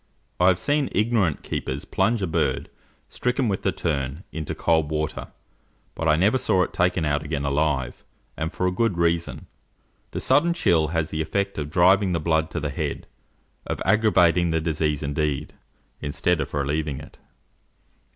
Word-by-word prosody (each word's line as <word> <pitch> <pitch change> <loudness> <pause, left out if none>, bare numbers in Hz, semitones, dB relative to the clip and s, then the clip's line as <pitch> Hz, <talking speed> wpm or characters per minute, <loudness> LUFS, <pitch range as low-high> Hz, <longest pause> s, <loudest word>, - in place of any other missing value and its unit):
I 90 - +5
have 95 -1 +5
seen 145 - 0
ignorant 105 -7 +1
keepers 65 +2 -4
plunge 115 -3 +1
a - - +2
bird, 80 - -1 0.4
stricken 125 +1 -1
with 100 -3 -1
the 95 - +1
"turn," 75 -2 -3
into 80 -2 -4
cold 80 -3 +1
water; 75 -1 -3 0.7
but 80 - -3
I 75 - +5
never 105 +10 +3
saw 90 -6 +2
it - - -5
taken 90 -2 +1
out 75 0 0
again 75 -2 -3
alive; 70 -3 -1 0.3
and 80 +1 -3
for 90 - -2
a 90 - +2
good 100 0 0
reason: 85 0 0 0.6
the - - -4
sudden 170 +4 +3
chill 80 - +2
has 80 0 -2
the 80 - -2
effect 100 +4 -2
of 75 -1 -4
driving 95 +3 +4
the 85 - 0
blood 80 0 +1
to - - -3
the - - -3
head, - - -3 0.6
of - - -3
aggravating 90 -5 +4
the 80 0 +1
disease 75 -2 -1
indeed, 75 0 -2 0.5
instead 80 +3 0
of 70 - -4
relieving 75 0 -1
it. - - -13
80 Hz, 170 wpm, -24 LUFS, 75-95 Hz, 0.7 s, I